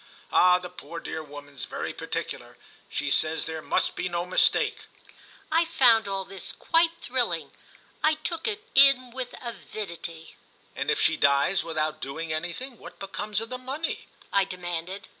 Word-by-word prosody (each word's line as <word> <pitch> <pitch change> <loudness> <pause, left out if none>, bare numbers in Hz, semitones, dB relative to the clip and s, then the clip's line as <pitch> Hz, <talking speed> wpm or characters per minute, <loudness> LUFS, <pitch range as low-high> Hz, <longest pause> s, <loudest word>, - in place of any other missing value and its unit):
Ah 180 0 +6
the 180 0 -6
poor 175 -1 -8
dear 160 - -4
woman's 145 -2 -7
very - - -4
particular—she 145 -1 -5
says 160 +2 +2
there 160 -1 -4
must - - +1
be 180 - -1
no 175 0 -1
mistake." 435 - +2 0.7
I 330 +2 +4
found 235 -8 +5
all 195 -1 -2
this 195 0 -3
quite 330 0 +3
thrilling—I 310 0 -1
took 330 +3 -2
it 425 -1 -2
in 270 -2 +7
with 255 0 -5
avidity. 170 -8 -6 0.4
"And - - -2
if - - +2
she - - +4
dies 140 +7 +4
without 155 -1 -2
doing 155 +4 -3
anything, 175 +11 -4
what - - -11
becomes 205 +1 -2
of 225 - -6
the 255 - -2
money?" 275 +6 -3 0.3
I 200 - +5
demanded. 180 0 -4
190 Hz, 150 wpm, -27 LUFS, 165-255 Hz, 0.7 s, in